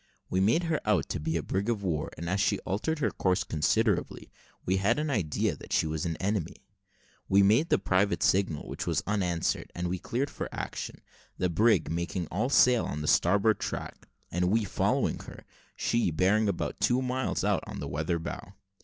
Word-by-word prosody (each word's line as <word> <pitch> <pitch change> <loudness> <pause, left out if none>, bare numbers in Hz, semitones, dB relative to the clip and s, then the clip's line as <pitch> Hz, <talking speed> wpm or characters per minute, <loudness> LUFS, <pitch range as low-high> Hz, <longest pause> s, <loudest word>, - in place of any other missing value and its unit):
We 95 - +1
made 110 - +3
her 165 -2 0
out 105 - +1
to 90 - -2
be 80 +2 -1
a 80 - -3
brig 100 +4 -2
of 110 -4 -1
war; 80 -6 -1
and 85 - -5
as 95 +3 0
she - - +2
altered 135 +12 -2
her 120 -9 0
course 90 -1 +1
considerably, 105 +6 0 0.3
we 95 +1 +1
had 100 +5 +2
an 150 0 -1
idea 90 - 0
that - - -13
she - - +2
was 80 +1 -2
an 80 - -3
enemy. 95 -3 -2 0.7
We 100 +1 +5
made 115 +12 +4
the - - +4
private 100 +1 +1
signal, 95 -6 +1
which - - -5
was - - 0
unanswered, 90 -5 -1
and 90 0 -2
we 90 +1 -2
cleared 135 +9 -2
for - - -5
action; - - -5 0.4
the 90 - 0
brig 105 -2 +3
making 85 +1 -2
all 110 +8 0
sail 125 -4 +5
on 75 - -4
the 75 - -3
starboard 105 +6 +3
tack, - - -5 0.2
and 90 +1 0
we 110 +3 +2
following 100 - 0
her - - -11 0.3
she 115 -5 +1
bearing 100 +6 +2
about 95 - -3
two 125 +2 +2
miles 130 +1 -1
on - - +2
out - - -5
weather 80 +4 -1
bow. 90 +3 -7
95 Hz, 195 wpm, -29 LUFS, 85-110 Hz, 0.7 s, We